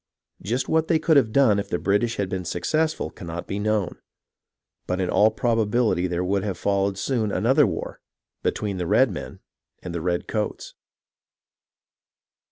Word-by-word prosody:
Just 125 +6 -2
what 160 0 +2
they 165 - +3
could 160 0 +2
have 130 -6 +4
done 110 -6 +4
if 100 0 -4
the - - 0
British 105 +6 +1
had 100 - -1
been 95 0 -3
successful 155 - -1
cannot 85 -1 -7
be 100 - -4
known; 105 -2 -1 0.9
but 90 +1 -1
in 90 -1 -1
all 105 - +5
probability 110 -4 +1
there 90 0 -2
would 95 +1 0
have 100 -3 -3
followed 100 -1 0
soon 110 -2 -1
another 125 +9 +3
war - - -5 0.4
between 100 -3 -2
the 90 - -1
redmcn 120 -4 +1 0.5
and 90 - -6
the 85 - -3
redcoats. 90 +5 -2
105 Hz, 155 wpm, -24 LUFS, 95-120 Hz, 0.9 s, all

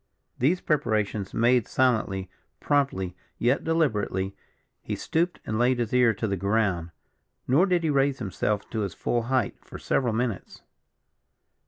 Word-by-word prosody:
These 160 +9 +2
preparations 110 - 0
made 120 0 +3
silently, 110 -7 +1 0.3
promptly, 95 -11 0 0.2
yet 125 +4 +1
deliberately, 105 - 0 0.5
he - - -4
stooped 170 +2 -1
and 110 0 -2
laid 125 +1 +3
his 120 -2 -2
ear 125 -2 +5
to 110 +2 -2
the 100 - 0
ground; 100 -3 0 0.6
nor 150 +10 +4
did 180 -2 +1
he 160 - +1
raise 135 -1 +2
himself 105 -1 -2
to 110 - -2
his 100 -4 -3
full 120 - 0
height 130 -5 0
for - - -10
several 120 -4 0
minutes. 115 -4 -3
120 Hz, 145 wpm, -26 LUFS, 100-135 Hz, 0.6 s, ear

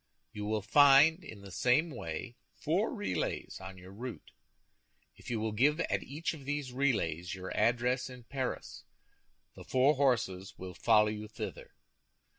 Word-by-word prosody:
You 105 -2 -5
will 105 -1 -1
find, 145 - +6
in 110 -8 -10
the 100 -1 -11
same 130 - +2
way, 115 - -6 0.2
four 180 +9 0
relays 205 -4 -3
on 95 0 -8
your 95 +1 -12
route. 120 +5 -8 0.8
If - - -12
you 115 -2 -1
will 110 0 -1
give 140 +9 +3
at - - 0
each 155 +5 -4
of 150 -4 -10
these 145 -2 -3
relays 90 - 0
your 95 0 -6
address 125 +2 +1
in 125 -1 -11
Paris, 130 +1 -4 0.7
the - - -11
four 135 +3 +3
horses 100 -9 0
will 95 0 -7
follow 105 +4 +4
you 105 0 -5
thither. 110 - -7
120 Hz, 155 wpm, -32 LUFS, 100-140 Hz, 0.8 s, find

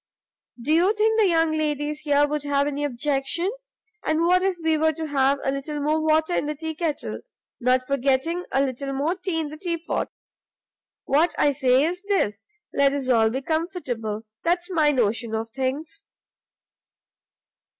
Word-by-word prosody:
do 275 +6 0
you 355 +6 +4
think 440 +1 +2
the 425 - +5
young 325 -2 +3
ladies 300 -1 -1
here 290 -1 +3
would 300 0 -2
have 285 0 +1
any 290 0 -2
objection? 290 +7 -1 0.5
and 310 +1 +1
what 360 +2 +4
if 380 -1 0
we 320 -1 +3
were 315 +1 +3
to 320 +1 -5
have 275 -2 +2
a 270 - +1
little 275 +2 -4
more 305 +2 +1
water 315 +2 +2
in 295 - 0
the 300 - -2
tea 320 +2 -4
kettle? 315 -2 -3 0.4
not 255 0 +2
forgetting 275 +6 0
a 270 - +3
little 275 +1 -3
more 285 +5 0
tea 370 -3 -3
in 310 -2 -2
the 305 - -9
teapot. 335 0 -2 1.0
What 305 +6 +2
I 290 - +4
say 265 -1 +3
is 355 +5 -1
this, 390 - 0 0.3
let 280 0 +3
us 275 -2 -2
all 225 -3 +4
be 260 +4 -3
comfortable; 260 - -3 0.2
that's 350 +2 0
my 310 -4 +3
notion 230 -3 0
of 225 +1 -4
things." 285 - -3
295 Hz, 170 wpm, -24 LUFS, 270-330 Hz, 1.0 s, the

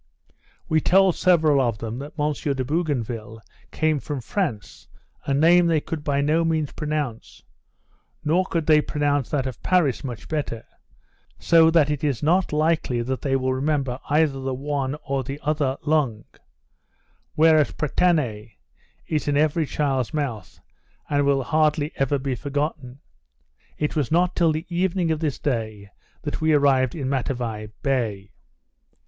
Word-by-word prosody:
We 155 0 +2
told 190 +2 +4
several 155 -6 +3
of 120 -4 0
them, 115 +2 -5
that 145 +2 -8
M. 150 +1 +1
de 135 -2 -2
Bougainville 120 -8 -2 0.3
came 155 -2 0
from 145 0 -5
France, 130 - -4 0.4
a 140 - 0
name 170 +4 +5
they 165 -2 +3
could 150 0 -6
by 140 -1 0
no 155 +3 +2
means 160 -3 0
pronounce; 150 -7 -4 0.8
nor 170 +5 +3
could 165 -3 -1
they 155 -1 +5
pronounce 145 -3 -1
that 140 -3 -1
of 130 -3 -6
Paris 170 -9 +1
much 125 -5 -7
better; 145 -7 -3 0.7
so 165 -1 +5
that 160 -3 +3
it 150 -1 -3
is 140 -4 -1
not 175 +4 +2
likely 155 -5 +1
that 130 +2 -3
they 135 -1 0
will 130 0 0
remember 135 -2 -1
either 150 -2 +2
the 130 -1 -3
one 140 0 -2
or 135 -1 -1
the 135 +3 -6
other 145 -3 0
long; 140 -8 0 1.1
whereas 155 -1 +4
Pretane 135 - 0 0.5
is 155 -2 -2
in 145 -1 +1
every 155 +1 +1
child's 135 -2 -1
mouth, 120 - -4 0.5
and 145 -1 +2
will 135 -1 +2
hardly 155 +2 +1
ever 135 +1 +1
be 135 0 -3
forgotten. 140 0 -4 0.8
It 150 +1 -2
was 150 -3 -1
not 180 +2 +2
till 170 -2 +3
the 155 +2 -3
evening 175 -1 0
of 155 - -1
this 155 -4 -2
day 110 -6 -3 0.3
that - - -4
we 160 0 +3
arrived 135 -3 +3
in 140 -5 -3
Matavai 120 -5 -2 0.2
bay. 110 -8 -1
145 Hz, 155 wpm, -23 LUFS, 130-155 Hz, 1.1 s, name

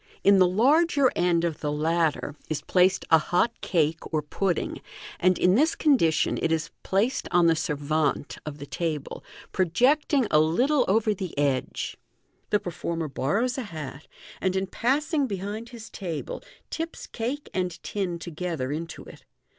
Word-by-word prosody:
In 200 0 +6
the 185 - +6
larger 280 - +3
end 175 -1 +2
of 170 -3 -1
the 150 - -2
latter 160 0 0
is 155 - -2
placed 185 +1 +3
a 160 - +8
hot 180 +9 0
cake 165 -5 +1
or 155 -2 0
pudding, 175 +4 -2 0.4
and 185 0 +3
in 180 - +4
this 305 +10 +3
condi 270 - +4
tion 155 - 0
it 165 - +1
is 160 0 -1
placed 220 +7 0
on 175 -1 +4
the 165 -1 +5
servante 150 -1 -1
of 150 -1 -6
the 140 - -8
table, 155 -2 -4 0.3
pro 185 - +2
jecting 265 - +2
a 150 - +6
little 245 - +3
over 215 +2 +2
the 185 -5 -6
edge. 140 -3 -1 0.5
The 210 - +3
performer 165 -2 -4
borrows 225 - 0
a 230 -5 -6
hat, 150 -2 -7 0.3
and 185 0 0
in 190 0 0
passing 280 - 0
behind 205 +3 -5
his 235 -3 -10
table, 190 - -5 0.3
tips 325 +1 -5
cake 255 +6 -4
and 185 -1 0
tin 190 -4 -2
together 165 -5 -4
into 160 +2 -5
it. - - -14
180 Hz, 160 wpm, -26 LUFS, 160-230 Hz, 0.5 s, a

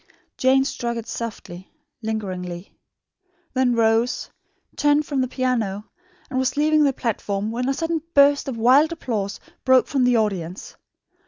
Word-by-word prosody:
Jane 265 +1 +3
struck 235 -3 -3
it 230 - -6
softly, 190 -5 -7 0.3
lingeringly; 185 -5 -5 0.8
then 255 -2 +2
rose, 230 +1 +1 0.4
turned 295 0 +2
from 280 -3 -1
the 255 - 0
piano, 230 -6 -1 0.4
and 260 -3 -2
was 260 +1 -1
leaving 305 +1 +3
the 280 - +3
platform, 215 -4 -2
when 250 +3 -2
a - - +2
sudden 325 0 -1
burst 280 0 +5
of 255 -4 -4
wild 265 +8 +5
applause 215 -11 -3 0.2
broke 260 -1 +5
from 270 -3 0
the 245 -1 +4
audience. 190 -5 -3
245 Hz, 145 wpm, -22 LUFS, 215-270 Hz, 0.8 s, burst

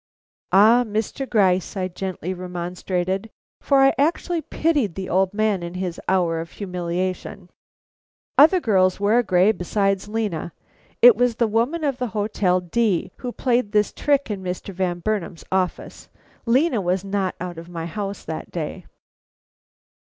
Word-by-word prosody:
"Ah, 220 +5 +6
Mr. 220 +4 -3
Gryce," 190 -3 +2
I 185 -1 -1
gently 185 -1 -5
remonstrated, 180 +2 -3 0.3
for 275 -1 +3
I 270 0 +5
actually 330 +3 +1
pitied 295 - 0
the 190 -1 -5
old 190 +1 +2
man 210 -2 0
in 170 +1 -6
his 180 -2 -4
hour 175 -3 +1
of 165 0 -7
humiliation, 180 0 -4 0.8
"other 320 +6 +7
girls 185 - +2
wear 210 +4 +3
gray 185 -2 +3
besides 195 +1 -1
Lena. 210 -7 -3 0.5
It 245 -2 +10
was 245 +1 +1
the 235 - +2
woman 235 +10 0
of 275 -3 -1
the 250 - -1
Hotel 205 -3 +1
D 185 0 0
who 250 - -5
played 240 -4 0
this 210 -1 +2
trick 285 -5 +1
in 200 -2 -4
Mr. 185 +1 -5
Van 175 -1 -2
Burnam's 195 -4 -3
office. 185 -1 -2 0.4
Lena 255 -1 +3
was 180 +1 0
not 195 -2 -1
out 175 -2 -6
of 170 +1 -11
my 165 -2 -5
house 200 +3 -5
that 160 0 -6
day." 170 +1 -5
195 Hz, 150 wpm, -22 LUFS, 180-225 Hz, 0.8 s, It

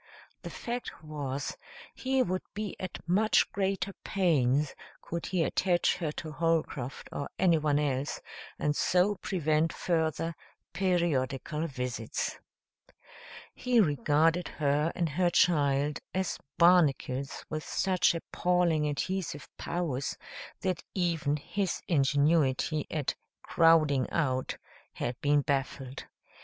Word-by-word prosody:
The - - -6
fact 240 -8 -5
was, 145 -3 -4 0.4
he 265 0 +1
would 185 -2 -1
be 210 -1 -4
at 185 -2 -7
much 210 +5 +3
greater 195 0 -1
pains 150 - +2 0.3
could 170 0 -5
he 180 -3 +1
attach 175 +1 +2
her 165 -4 -2
to 155 0 -6
Holcroft 155 -5 -1
or 140 - -4
anyone 155 -5 +3
else 145 -1 -1 0.4
and 150 0 0
so 185 +6 +3
prevent 160 -3 +1
further 165 -1 -1 0.4
periodical 165 -4 0
visits. 125 -5 -3 1.1
He 250 -1 +2
regarded 155 - +3
her 150 +2 +1
and 170 -2 +1
her 175 +4 +1
child 145 -4 +2 0.2
as 190 -1 -1 0.2
barnacles 150 -6 +3
with 155 0 -3
such 185 -2 +2
appalling 170 -2 +1
adhesive 160 +1 -3
powers 155 -7 -2 0.4
that 185 -2 -1
even 165 -5 +1
his 190 +5 -2
ingenuity 145 0 +2
at 150 -4 -1 0.3
"crowding 155 -6 +4
out" 130 -5 -1 0.4
had 120 - -4
been 145 0 +3
baffled. 135 -2 -2
160 Hz, 110 wpm, -30 LUFS, 145-180 Hz, 1.1 s, crowding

